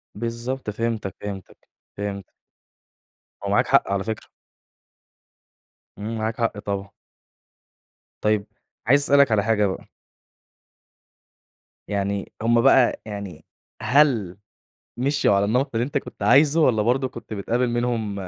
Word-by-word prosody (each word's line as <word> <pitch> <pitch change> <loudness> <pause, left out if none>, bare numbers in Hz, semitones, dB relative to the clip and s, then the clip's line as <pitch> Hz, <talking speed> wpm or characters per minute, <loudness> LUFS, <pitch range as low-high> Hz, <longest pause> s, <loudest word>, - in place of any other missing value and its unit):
بالضبط 115 +3 -4
فهمتَك 110 -3 -3
فهمتَك، 100 -3 -7 0.4
فهمت. 100 -2 -5 1.1
هو - - -3
معاك - - +2
حق، - - +3
على 100 -1 0
فكرة. 110 0 -5 1.7
امم 110 +3 -4
معاك 110 +1 -2
حق، 115 -2 0
طبعًا. 100 -1 -4 1.3
طَيب 105 -1 +1 0.4
عايز 140 +3 +5
أسألك 140 -3 +5
على 105 -2 +3
حاجة 110 -1 +2
بقى. 95 - -6 2.0
يعني 100 -1 -2
هُم 115 +1 +3
بقى، 130 -1 +4
يعني 100 -7 -7 0.4
هل 125 -10 +2 0.6
مشيوا 140 -3 +2
على 100 - +2
النمط 125 +7 +1
اللي 115 - +1
أنتَ 140 - -1
كُنت - - -11
عايزه، 145 +4 +5
والّا 120 -8 +3
برضه 130 +4 +1
كُنت 120 -2 -11
بتقابل 120 +5 0
منهم 120 -3 -1
110 Hz, 120 wpm, -23 LUFS, 100-125 Hz, 2.0 s, عايز